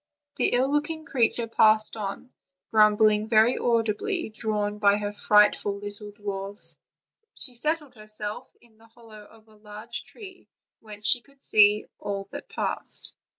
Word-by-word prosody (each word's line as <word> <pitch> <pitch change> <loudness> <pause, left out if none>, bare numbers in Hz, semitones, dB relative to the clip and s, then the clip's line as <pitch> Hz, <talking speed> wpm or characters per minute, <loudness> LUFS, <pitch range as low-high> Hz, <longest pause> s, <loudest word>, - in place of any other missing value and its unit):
The - - +1
ill 260 +3 +2
looking 310 +2 -1
creature 235 -3 +1
passed 215 -1 +3
on, 210 +4 -6 0.4
grumbling 215 0 +4
very 225 +2 +4
audibly, 235 - 0
drawn 210 -1 -3
by 200 -1 +4
her 205 0 -4
frightful 210 -1 +3
little 205 +1 -8
dwarfs; 200 -1 -5 0.6
she 250 -3 0
settled 300 +2 -2
herself 215 -1 -7
in 225 -2 -25
the 225 - -19
hollow 225 -2 -15
of 220 +1 -20
a 220 - -21
large 210 +2 -7
tree, 380 -4 -13 0.3
whence 210 -1 -11
she 245 +2 +3
could 275 +2 -22
see 210 0 +5
all 200 -1 -4
that - - -8
passed. - - -3
215 Hz, 145 wpm, -26 LUFS, 210-240 Hz, 0.6 s, see